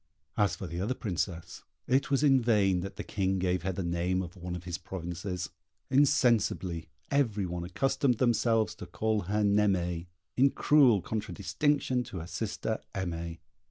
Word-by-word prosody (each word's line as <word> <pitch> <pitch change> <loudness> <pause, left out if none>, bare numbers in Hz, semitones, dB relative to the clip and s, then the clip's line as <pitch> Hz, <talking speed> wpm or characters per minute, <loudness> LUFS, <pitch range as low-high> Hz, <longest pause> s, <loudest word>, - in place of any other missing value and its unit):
As 105 -1 +2
for - - -7
the 85 +1 -4
other 115 +7 -1
Princess, 90 - -3 0.2
it 135 +2 +2
was 140 +1 +2
in 135 -3 +5
vain 100 -6 +3
that 95 +2 -5
the - - -5
King 95 -2 -1
gave 90 -1 0
her 95 +2 -1
the 95 +1 -3
name 85 +2 0
of 85 -1 -9
one 90 -1 -5
of 90 - -7
his 90 -1 -4
provinces; 90 0 -5 0.4
insensibly 120 - +2 0.2
every 115 -8 +1
one 90 -1 -4
accustomed 125 +6 +1
themselves 115 -2 +2
to - - -9
call 110 -1 0
her 105 +3 0
Naimée, 95 -4 +1 0.3
in 135 +2 +5
cruel 130 - +4
contradistinction 125 - 0
to - - -7
her 80 - -5
sister 105 +4 -3 0.2
Aimée. 85 -3 -3
95 Hz, 160 wpm, -30 LUFS, 90-120 Hz, 0.4 s, in